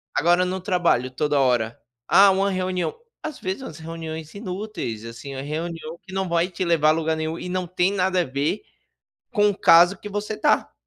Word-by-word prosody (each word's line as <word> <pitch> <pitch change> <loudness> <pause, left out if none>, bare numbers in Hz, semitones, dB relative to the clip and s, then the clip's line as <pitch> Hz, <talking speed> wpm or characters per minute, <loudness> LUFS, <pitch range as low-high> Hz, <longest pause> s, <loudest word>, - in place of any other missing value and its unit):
Agora 175 +3 +3
no 185 0 -3
trabalho 175 - +1
toda 145 +2 0
hora: 120 -3 +1 0.3
"Ah, 200 +1 +7
uma 195 +1 +1
reunião". 185 - -1 0.3
Às 310 - -5
vezes 190 +7 -3
umas 260 - -8
reuniões 160 -1 -7
inúteis, 190 - -5
assim, 115 +4 -8
uma 135 - -4
reunião 160 +2 -5
que 190 - -12
não 190 0 -1
vai 170 +2 +1
te 185 +1 -3
levar 165 -3 +3
a - - +7
lugar 160 0 0
nenhum 160 +1 -3
e 180 - -6
não 185 0 -1
tem 180 +2 +1
nada 185 -2 +1
a - - +1
ver 140 +8 -1 0.7
com 210 -2 +4
o 200 - -5
caso 175 +3 +6
que 210 - -8
você 205 +1 -3
tá. 295 - +2
175 Hz, 200 wpm, -23 LUFS, 155-190 Hz, 0.7 s, Ah